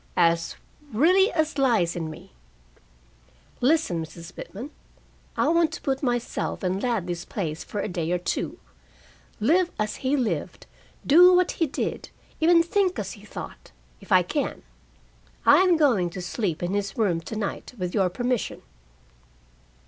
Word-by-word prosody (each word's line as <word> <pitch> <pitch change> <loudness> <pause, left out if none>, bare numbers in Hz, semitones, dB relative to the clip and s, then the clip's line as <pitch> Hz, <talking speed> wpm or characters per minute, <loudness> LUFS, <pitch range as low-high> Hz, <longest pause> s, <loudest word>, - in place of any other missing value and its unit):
"As 170 0 +2 0.4
really 360 - +4
as 315 -3 -1
lies 230 -11 +2
in 165 -2 -3
me. 155 - -11 1.3
Listen, 250 - +2
Mrs. 165 +2 -11
Pitman. 245 +10 -8 0.7
I - - +2
want 335 -1 +3
to - - -6
put 270 -2 -1
myself 245 -5 -2
in 185 +1 0
Ladley's 180 -8 -2
place 160 -6 -4
for 205 - -4
a - - -2
day 170 -3 -3
or 180 - +2
two, 175 - -3 0.8
live 340 - +3
as 210 0 -2
he 275 +2 0
lived, 245 -5 -2 0.4
do 360 +5 +7
what 360 0 +3
he 325 - 0
did, 275 - -4 0.3
even 335 +1 +5
think 370 +1 +1
as 195 -2 -3
he 205 - -12
thought, 210 - -9 0.3
if - - -16
I - - +6
can. - - -3 0.8
I - - +8
am 365 -2 +4
going 235 - +3
to 185 +2 -7
sleep 175 -3 -2
in 175 +2 -1
his 200 -1 -2
room 185 -7 +1
to 190 - -7
night, 215 +3 -4
with 180 -2 -3
your 190 -3 +2
permission." 245 +4 -2
220 Hz, 155 wpm, -25 LUFS, -, 1.3 s, I